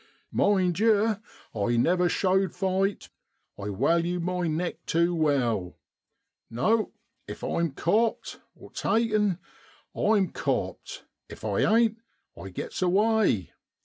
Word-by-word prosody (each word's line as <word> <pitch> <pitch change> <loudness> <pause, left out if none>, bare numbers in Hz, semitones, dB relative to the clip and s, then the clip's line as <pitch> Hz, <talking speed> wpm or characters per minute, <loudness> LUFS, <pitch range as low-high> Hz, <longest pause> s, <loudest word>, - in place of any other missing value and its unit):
Mind 185 -4 +2
yer, 220 -1 +3 0.3
I 115 +3 0
never 175 +7 +3
showed 190 +1 +1
fight, 195 +1 -1 0.5
I 100 - -8
walue 170 - +1
my 180 0 -1
neck 165 +3 -3
tew 170 +2 +2
well. 125 - 0 0.7
No! 175 - +1 0.3
if - - -8
I'm 170 -4 -1
copt 215 +10 0 0.3
(taken), 215 -5 +1 0.6
I'm 205 -3 +2
copt, - - -3 0.2
if - - -10
I - - 0
ain't 225 0 +3 0.4
I 90 +3 -9
get's 90 - -6
away. 195 - +2
180 Hz, 110 wpm, -27 LUFS, 155-210 Hz, 0.7 s, yer